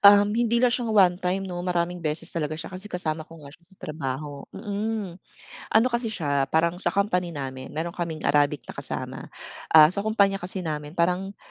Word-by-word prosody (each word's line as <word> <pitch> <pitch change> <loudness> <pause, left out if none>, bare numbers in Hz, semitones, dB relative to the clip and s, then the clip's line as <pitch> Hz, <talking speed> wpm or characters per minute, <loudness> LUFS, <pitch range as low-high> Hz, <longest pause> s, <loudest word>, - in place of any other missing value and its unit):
Um, 205 0 +7
hindi 235 0 +1
lang 245 - +4
siya 240 -2 -1
one 185 -4 +4
time 185 +2 -1
no 180 -2 -5
maraming 175 0 -1
beses 160 +2 -3
talaga 155 -2 -2
siya 160 - -8
kasi 185 +3 -8
kasama 160 -5 -2
ko 165 - -12
nga 140 - -11
siya 170 - -20
sa 190 - -19
trabaho, 145 -1 -5
mm. 205 -3 -4 0.6
Ano 225 +3 +5
kasi 235 -1 0
siya 145 -9 -1
parang 170 +3 +1
sa - - +2
company 180 -3 0
namin 130 -2 -6
meron 165 +2 -3
kaming 165 -3 -5
Arabic 145 -2 +2
na - - -8
kasama. - - +1 0.4
Ah, 155 +1 +8
sa 200 - -2
kumpanya 200 -2 +2
kasi 185 +1 -2
namin 150 0 -5
parang 180 +3 0
175 Hz, 195 wpm, -25 LUFS, 155-200 Hz, 0.6 s, Ah